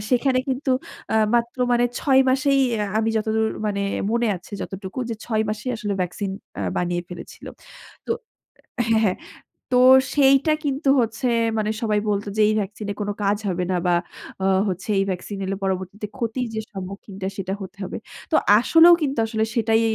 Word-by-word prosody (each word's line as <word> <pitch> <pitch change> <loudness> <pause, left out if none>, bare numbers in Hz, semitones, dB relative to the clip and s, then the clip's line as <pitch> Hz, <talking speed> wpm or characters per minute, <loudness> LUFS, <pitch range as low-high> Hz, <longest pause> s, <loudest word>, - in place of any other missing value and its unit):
সেখানে 255 +1 +3
কিন্তু 265 +1 -1 0.4
আ - - +1 0.2
মাত্র 235 +1 0
মানে, 240 0 +3
৬ 265 -2 +4
মাসেই 275 +1 +3 0.4
আমি 220 0 +1
যতদূর 220 0 +1 0.2
মানে 200 -1 -1 0.3
মনে 235 +1 +1
আছে 180 +4 -15
যতটুকু 195 +3 -7
যে, 230 - -1
৬ 220 -2 0
মাসেই 215 +4 -3
আসলে 210 -2 -3
ভ্যাকসিন 185 +2 -2 0.3
অ্যা - - -3
বানিয়ে 175 0 -1
ফেলেছিল। 180 - -10 0.6
তো - - -6 0.8
হ্যাঁ, 220 -1 +4
হ্যাঁ। 185 -3 +1 0.6
তো 250 - +4 0.4
সেইটা 275 +1 +5
কিন্তু 280 0 0
হচ্ছে 230 +3 -2 0.3
মানে 215 0 0
সবাই 215 -2 +1
বলতো 205 0 -1
যে, - - +4
"এই - - +2
ভ্যাকসিন 205 +1 -5
এ - - -2
কোন 205 - -2
কাজ 200 +1 +2
হবে 180 0 -1
না - - +1
বা 175 - +4 0.7
হচ্ছে 190 +2 -4
এই - - +3
ভ্যাকসিন 190 +2 -4
এলে 195 +1 -2
পরবর্তীতে 190 +2 -3
ক্ষতির 245 0 -2
যে 220 - -1
সম্মুখীনটা, 195 0 -6
সেটা 190 -1 -3
হতে 190 +1 -9
হবে।" 185 - -5 0.3
তো - - +3 0.2
আসলেও 330 +7 +7
কিন্তু 275 -3 -1
আসলে 220 -1 -1
সেটাই 225 -1 +3
220 Hz, 170 wpm, -23 LUFS, 195-250 Hz, 0.8 s, আসলেও